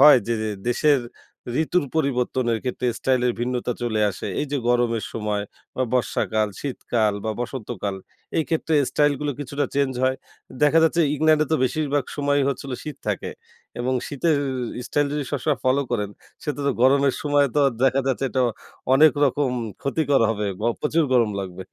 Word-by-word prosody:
হয় 150 -3 +9
যে 115 - 0
যে 110 - -1 0.2
দেশের 140 +3 +3 0.6
ঋতুর 180 0 +1
পরিবর্তনের 125 -4 0
ক্ষেত্রে 125 0 -2
স্টাইল 130 -1 +1
এর 125 - +2
ভিন্নতা 125 0 -1
চলে 110 -3 0
আসে? - - -6
এই 150 - -1
যে - - +2
গরমের 120 -2 +2
সময় 105 -2 -2 0.3
বা 130 - 0
বর্ষাকাল, 110 -3 +1
শীতকাল 115 -6 0
বা 110 - 0
বসন্তকাল 115 -5 -4 0.4
এই 160 - +2
ক্ষেত্রে 160 -1 0 0.2
স্টাইল 145 -1 +3
গুলো 145 -1 -1
কিছুটা 145 +1 -2
চেঞ্জ 140 -2 +1
হয়। 130 0 +2 0.5
দেখা 150 +2 +5
যাচ্ছে 165 +1 +3
ইংল্যান্ডে 155 +1 +3
তো 160 - +5
বেশিরভাগ 145 0 0
সময়ই 145 -1 +2
হচ্ছিল 140 0 -4
শীত 150 -3 -6
থাকে। 105 - -2 0.5
এবং 130 +2 0
শীতের 150 +2 +1 0.5
স্টাইল 145 0 +1
যদি 150 -1 -2
সব 145 - -1
সময় 150 -3 +1
ফলো 130 +2 +3
করেন, 105 -4 -1 0.3
সে - - -2
তো - - -5 0.2
গরমের 135 +1 +4
সময় 145 -1 +3
তো - - +2
আর 135 - +1
দেখা 135 0 +4
যাচ্ছে 135 0 0
এটা 130 - +1 0.5
অনেক 150 +3 +7
রকম 140 0 +1 0.3
ক্ষতিকর 140 -1 +1
হবে। 105 -2 -2
বা 110 - 0
প্রচুর 155 +2 +2
গরম 120 -4 +4
লাগবে। 95 -1 -6
135 Hz, 170 wpm, -23 LUFS, 120-145 Hz, 0.6 s, হয়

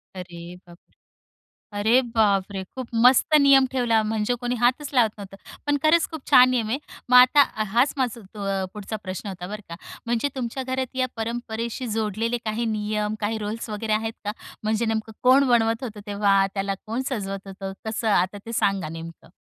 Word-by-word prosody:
अरे 180 -2 -8 0.3
बाप 170 0 -14
रे! - - -35 0.9
अरे 225 +5 +4
बापरे! 200 -3 +1
खूप 255 +5 -8 0.2
मस्त 260 +4 +5
नियम 275 -1 +6
ठेवला 235 -4 +2
म्हणजे 215 +2 -1
कोणी 245 0 -1
हातच 255 +4 +2
लावत 235 -4 +4
नव्हतं. 195 -1 -9 0.3
पण 290 0 +2
खरंच 320 +1 +4
खूप 320 -2 -6
छान 255 0 +8
नियम 235 -4 0
आहे. 250 +5 -1 0.3
मग 250 - +7
आता 255 +3 +8 0.3
हाच 245 +5 +3
माझा 245 -4 -1
तो 210 - -7
अ, 195 -1 -1
पुढचा 210 +1 -5
प्रश्न 185 +2 -6
होता 180 -2 -6
बरं 210 +3 -6
का. 170 - -7 0.3
म्हणजे 235 +4 0
तुमच्या 255 +1 -3
घरात 260 0 -3
या 255 0 +2
परंपरेशी 230 +1 -4
जोडलेले 225 +2 -1
काही 220 +2 -2
नियम, 210 0 -2
काही 220 +1 -1
रोल्स 220 +2 -5
वगैरे 215 +1 -3
आहेत 220 +1 0
का? 210 - -2 0.3
म्हणजे 220 +2 0
नेमकं 220 0 -2
कोण 265 +2 +5
बनवत 225 -1 +2
होतं 215 -4 -7
तेव्हा, 200 -1 +3
त्याला 195 0 -1
कोण 230 +4 -2
सजवत 195 -5 -4
होतं? 195 0 -6
कसं? 220 +1 -2
आता 190 0 +2
ते 230 - -6
सांगा 195 -5 +1
नेमकं. 165 0 -9
220 Hz, 180 wpm, -24 LUFS, 205-245 Hz, 0.9 s, छान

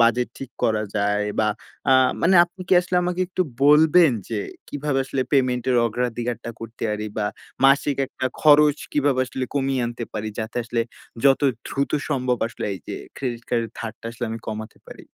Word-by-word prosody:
budget 120 +1 +3
ঠিক 135 -2 -7
করা 110 -1 +2
যায় 105 0 +1 0.2
বা 110 - +2 0.4
আ - - +7 0.3
মানে 185 +3 +4
আপনি 175 +2 -18
কি 185 - +5
আসলে 180 0 -2
আমাকে 180 +1 -1
একটু 185 0 0 0.2
বলবেন? 155 +1 +6 0.2
যে 115 - -2 0.3
কিভাবে 145 -1 -1
আসলে 135 0 -2
payment 125 -3 +2
এর 125 - +3
অগ্রাধিকারটা 120 0 -3
করতে 115 0 -9
পারি? 105 0 -3
বা 105 - 0 0.4
মাসিক 140 0 +3
একটা 130 - -3
খরচ 150 -1 +6 0.2
কিভাবে 140 -3 +2
আসলে 130 +1 -3
কমিয়ে 135 -2 0
আনতে 120 0 -5
পারি? 110 0 -3
যাতে 110 +1 -4
আসলে 115 0 -1 0.4
যত 135 -1 +5 0.3
দ্রুত 140 0 -1 0.2
সম্ভব 130 -4 0
আসলে 120 - -6
এই - - -8
যে - - -4 0.2
credit 120 -3 -4
card 120 -1 +1
এর 115 - -7
ধারটা 110 -1 -7
আসলে 120 +1 -5
আমি 115 - -4
কমাতে 110 0 -6
পারি। - - -11
125 Hz, 180 wpm, -23 LUFS, 115-145 Hz, 0.4 s, আ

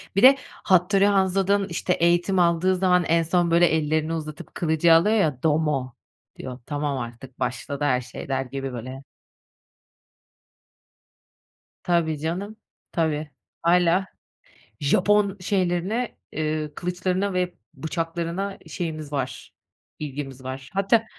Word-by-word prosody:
Bir 195 - +2
de 270 +1 +9 0.3
Hattori 190 +2 +4
Hanzo'dan 195 0 +2
işte 170 +2 0
eğitim 175 +2 +2
aldığı 175 +2 +3
zaman 180 -1 +3
en 165 0 +3
son 170 +1 +1
böyle 170 +1 +6
ellerini 155 0 0
uzatıp 155 -2 -6
kılıcı 165 0 +3
alıyor 195 +7 +5
ya, 150 - +1
doumo 150 -5 +1 0.4
diyor. 125 -1 -7
Tamam 145 -2 -2
artık, 120 +2 -8
başladı 130 +3 -3
her 130 -3 +2
şey, - - -9
der 135 -1 +1
gibi 135 0 -5
böyle. 130 +3 -7 2.8
Tabii 165 -3 +1
canım, 185 +8 -4 0.4
tabii. 155 -2 -1 0.3
Hâlâ 175 +2 +3 0.7
Japon 200 +6 +3
şeylerine, 185 +5 -1 0.2
eee, 155 0 -2
kılıçlarına 185 +3 -1
ve 180 -1 0 0.2
bıçaklarına 170 +4 -3
şeyimiz 155 -4 -5
var, 130 -4 -4 0.5
ilgimiz 135 -3 -6
var. 130 0 -6
Hatta 200 +4 +3
165 Hz, 115 wpm, -24 LUFS, 145-185 Hz, 2.8 s, de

